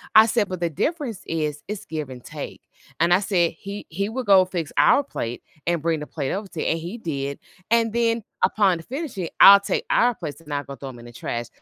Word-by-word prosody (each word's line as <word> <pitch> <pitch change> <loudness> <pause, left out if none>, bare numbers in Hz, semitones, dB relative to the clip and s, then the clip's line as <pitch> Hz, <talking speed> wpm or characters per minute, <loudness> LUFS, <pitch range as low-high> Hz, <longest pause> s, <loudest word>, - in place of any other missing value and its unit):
I 220 - +10
said, 220 -3 +1
"But 185 -2 -4
the 170 - +1
difference 250 - -2
is, 150 -3 -2
it's 210 -2 -5
give 155 -4 -4
and 125 -1 -9
take." - - -8 0.4
And 170 +2 +4
I 185 - +4
said, 180 -4 +2
"He 200 +1 -7
he 200 +5 -2
will 255 +3 -3
go 195 -2 +7
fix 175 -4 -4
our 285 - +6
plate, 120 - -5 0.2
and 170 -3 +1
bring 160 -2 0
the 150 - -6
plate 140 -4 -3
over 200 +1 -4
to 170 -3 -8
you," - - -1
and 165 - +1
he 175 +8 -6
did, 140 -6 -3 0.3
and 230 -1 +3
then, 230 -1 +1 0.2
upon 190 -6 +3
finishing, 245 - -5
I'll 200 0 +11
take 200 - -2
our 245 +1 +4
plates 155 -2 -7
and 150 -3 -8
I'll 145 -1 -2
go 140 - -8
throw 135 0 -8
them 125 -2 -11
in 120 - -12
the 120 - -12
trash 120 0 -4
175 Hz, 240 wpm, -23 LUFS, 150-215 Hz, 0.4 s, I'll